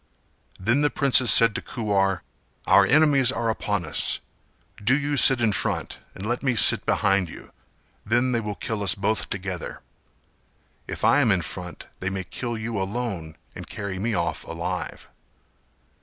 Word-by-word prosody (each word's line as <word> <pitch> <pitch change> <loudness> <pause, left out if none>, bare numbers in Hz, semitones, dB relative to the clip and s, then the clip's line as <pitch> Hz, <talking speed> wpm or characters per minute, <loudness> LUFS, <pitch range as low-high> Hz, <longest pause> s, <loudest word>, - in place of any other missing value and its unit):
Then 115 +9 +1
the 145 - +2
princess 130 -4 +5
said 115 -1 +7
to - - -4
Kuwar 100 -5 -1 0.4
"Our - - +5
enemies 140 -3 +4
are 115 -4 -1
upon 105 -5 -3
us; 75 - 0 0.6
do 130 +6 +3
you 145 0 -2
sit 135 -1 +5
in 115 -2 +2
front - - -3 0.2
and 95 - -8
let 120 +2 -2
me 130 -3 0
sit - - +5
behind 95 -3 +1
you, - - -13 0.5
then 120 +4 +1
they 120 - 0
will 105 -2 -5
kill 110 0 -5
us 95 -3 +3
both 105 +2 -2
together. 95 -2 -6 1.1
If - - -4
I 145 - +4
am 130 -6 +2
in 95 -3 +1
front 90 +1 -8
they 95 - -3
may 95 -1 -4
kill 120 +5 -6
you 110 -1 -4
alone 95 -6 -5 0.2
and - - -9
carry 100 -2 -6
me 110 +2 -2
off 85 - -2
alive." - - -6
110 Hz, 165 wpm, -23 LUFS, 95-125 Hz, 1.1 s, said